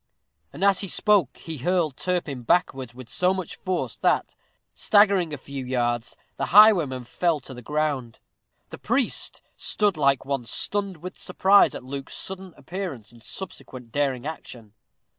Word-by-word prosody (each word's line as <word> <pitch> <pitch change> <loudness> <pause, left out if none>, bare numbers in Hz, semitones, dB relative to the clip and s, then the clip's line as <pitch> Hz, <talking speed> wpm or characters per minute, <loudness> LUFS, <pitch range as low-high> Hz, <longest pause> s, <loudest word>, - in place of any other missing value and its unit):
And 190 - -6
as 200 -1 +5
he 195 - -2
spoke 195 - +2
he 160 -3 -7
hurled 165 -1 +1
Turpin 170 -8 -2
backwards 130 -3 0
with 130 -2 -10
so 180 +8 +1
much 185 -3 -5
force 185 -2 -3
that, - - +1 0.4
staggering 200 -5 +4
a 145 - -4
few 140 0 -7
yards, 120 -2 -1 0.2
the - - -2
highwayman 175 - +6
fell 165 +6 0
to 130 - -10
the 125 - -9
ground. 145 -4 -2 0.5
The - - -8
priest - - -1
stood 205 -5 0
like 140 -3 +2
one 135 -3 -2
stunned 195 -2 -1
with 185 +1 -7
surprise 195 +2 +4
at - - -7
Luke's 135 +1 -6
sudden 190 -1 -5
appearance 175 - -6
and 120 -1 -17
subsequent 125 - -6
daring 135 -2 -1
action. 120 -8 -8
150 Hz, 155 wpm, -25 LUFS, 130-185 Hz, 0.5 s, highwayman